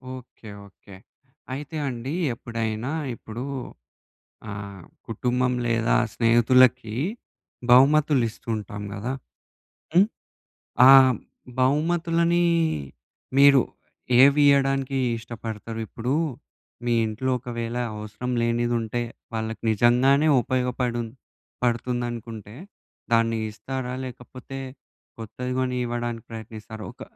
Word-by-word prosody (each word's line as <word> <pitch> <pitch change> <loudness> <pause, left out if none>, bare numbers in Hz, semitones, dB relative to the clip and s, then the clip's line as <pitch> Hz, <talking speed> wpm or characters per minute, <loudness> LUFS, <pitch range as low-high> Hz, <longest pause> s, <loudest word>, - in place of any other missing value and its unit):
Okay. 120 -3 -12 0.2
Okay. 100 0 -16 0.6
అయితే 145 +3 -6
అండి 125 +3 -5 0.2
ఎప్పుడైనా 115 +1 -3 0.2
ఇప్పుడు 115 +2 -7 1.1
ఆహ్, 100 -2 -7 0.3
కుటుంబం 125 +3 0
లేదా 115 -1 +2 0.2
స్నేహితులకి 120 -1 +4 0.8
బహుమతులిస్తూంటాం 120 -7 +3
గదా! 110 +5 -3 0.8
హ్మ్, 185 +3 +6 0.8
ఆ - - +11 0.7
బహుమతులని 170 +4 +2 1.0
మీరు 140 -2 +7 0.6
ఏవియ్యడానికి 140 -1 +4 0.2
ఇష్టపడతారు? 115 -1 -7
ఇప్పుడు 120 +3 -3 0.7
మీ 120 -1 +1
ఇంట్లో 115 +5 -2
ఒకవేళ 115 0 -5 0.2
అవసరం 105 +3 -6
లేనిదుంటే 120 0 0 0.3
వాళ్ళకి 110 0 -4
నిజంగానే 125 +7 +4
ఉపయోగపడుం 125 -1 -1 0.6
పడుతుందనుకుంటే 120 -3 -3 0.6
దాన్ని 115 0 +3
ఇస్తారా? 125 +4 -5
లేకపోతే 130 +1 -9 0.6
కొత్తది 125 +3 -5
గొని 125 -1 -1
ఇవ్వడానికి 120 -1 -3
ప్రయత్నిస్తారా? 110 -1 -8
ఒక - - -12
120 Hz, 80 wpm, -25 LUFS, 115-130 Hz, 1.1 s, ఆ